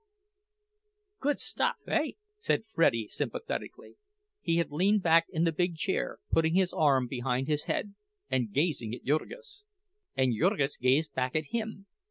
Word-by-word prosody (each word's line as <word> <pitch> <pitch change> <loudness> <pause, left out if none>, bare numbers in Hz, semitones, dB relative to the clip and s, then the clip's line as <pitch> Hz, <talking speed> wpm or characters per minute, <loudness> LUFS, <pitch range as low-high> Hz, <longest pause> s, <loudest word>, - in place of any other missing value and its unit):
"Good 290 +1 0
stuff, - - +1
hey?" - - 0 0.2
said 425 - 0
Freddie, 140 - +2
sympathetically; 470 - -5 0.4
he 165 - +1
had 170 -3 0
leaned 195 +6 +2
back 165 0 +5
in 160 - 0
the 165 - +3
big 175 +2 0
chair, 190 +5 -1
putting 160 +1 +3
his 185 -1 +2
arm 140 -5 +3
behind 125 +1 -2
his 150 -1 0
head 205 - -2 0.3
and 120 -5 0
gazing 135 - 0
at - - -13
Jurgis. 420 - -3 0.5
And 130 -2 +3
Jurgis 150 - +1
gazed 140 +4 +2
back 130 +1 -1
at 155 -2 -1
him. 220 -4 -3
160 Hz, 150 wpm, -30 LUFS, 135-195 Hz, 0.5 s, back